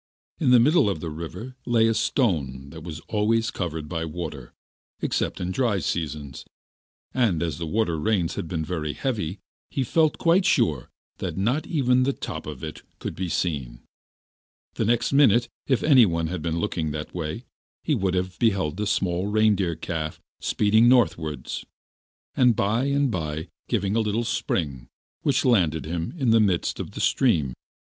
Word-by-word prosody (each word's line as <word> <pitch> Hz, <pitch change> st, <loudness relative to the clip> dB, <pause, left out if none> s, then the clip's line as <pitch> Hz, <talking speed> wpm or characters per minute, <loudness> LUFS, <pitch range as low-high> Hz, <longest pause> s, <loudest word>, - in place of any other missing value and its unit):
In 145 Hz, -7 st, +2 dB
the 125 Hz, -1 st, +7 dB
middle 145 Hz, -1 st, +4 dB
of 95 Hz, -, -2 dB
the 80 Hz, +1 st, -5 dB
river 85 Hz, +11 st, -7 dB
lay 115 Hz, -2 st, +3 dB
a 115 Hz, -, +3 dB
stone 75 Hz, -, 0 dB
that 80 Hz, 0 st, -9 dB
was 80 Hz, 0 st, -7 dB
always 110 Hz, +2 st, +1 dB
covered 80 Hz, -4 st, -4 dB
by 80 Hz, 0 st, -3 dB
water, 80 Hz, -5 st, -6 dB, 0.5 s
except -, -, -1 dB
in 90 Hz, +1 st, -2 dB
dry 115 Hz, -1 st, +1 dB
seasons, 75 Hz, -6 st, -3 dB, 0.7 s
and 105 Hz, -11 st, +2 dB
as 80 Hz, -2 st, -3 dB
the 85 Hz, -, -3 dB
winter 85 Hz, -3 st, 0 dB
rains 90 Hz, -1 st, +1 dB
had -, -, -4 dB
been 80 Hz, -2 st, -2 dB
very 75 Hz, -3 st, -3 dB
heavy, 105 Hz, -, -2 dB, 0.3 s
he 135 Hz, -, -1 dB
felt 155 Hz, +4 st, +2 dB
quite 175 Hz, +3 st, +3 dB
sure 75 Hz, -, +2 dB, 0.3 s
that -, -, -4 dB
not 125 Hz, +10 st, 0 dB
even 130 Hz, -5 st, +2 dB
the 135 Hz, +2 st, +2 dB
top 80 Hz, -10 st, -6 dB
of 75 Hz, -5 st, -7 dB
it -, -, -6 dB, 0.2 s
could -, -, -5 dB
be 95 Hz, -1 st, -3 dB
seen. 70 Hz, -8 st, -2 dB, 0.9 s
The 110 Hz, -, -1 dB
next 120 Hz, +4 st, +1 dB
minute, 120 Hz, -4 st, +5 dB, 0.2 s
if 130 Hz, -4 st, +2 dB
anyone 110 Hz, -, +5 dB
had 85 Hz, 0 st, -3 dB
been 85 Hz, 0 st, -1 dB
looking 80 Hz, -1 st, -1 dB
that 75 Hz, +1 st, -5 dB
way, 90 Hz, +7 st, -4 dB, 0.4 s
he 155 Hz, -, +1 dB
would 95 Hz, -7 st, 0 dB
have 95 Hz, 0 st, -2 dB
beheld 95 Hz, -7 st, +1 dB
a 105 Hz, -, 0 dB
small 90 Hz, -1 st, 0 dB
reindeer 105 Hz, -5 st, +2 dB
calf 80 Hz, -1 st, -4 dB, 0.2 s
speeding 110 Hz, +3 st, +3 dB
northwards, 80 Hz, -, +1 dB, 0.7 s
and 125 Hz, -3 st, +4 dB
by 110 Hz, +7 st, +1 dB
and 140 Hz, -1 st, +1 dB
by 80 Hz, -2 st, -3 dB, 0.2 s
giving 100 Hz, -3 st, 0 dB
a 115 Hz, -, +3 dB
great 110 Hz, +2 st, -1 dB
spring, 70 Hz, -, -2 dB, 0.3 s
which 140 Hz, -, +1 dB
landed 85 Hz, -, +3 dB
him 85 Hz, +1 st, -3 dB
in 130 Hz, -7 st, +2 dB
the 115 Hz, -, +6 dB
midst 95 Hz, -5 st, +1 dB
of -, -, -5 dB
the -, -, -5 dB
stream. 80 Hz, -, +2 dB
95 Hz, 170 wpm, -25 LUFS, 80-115 Hz, 0.9 s, the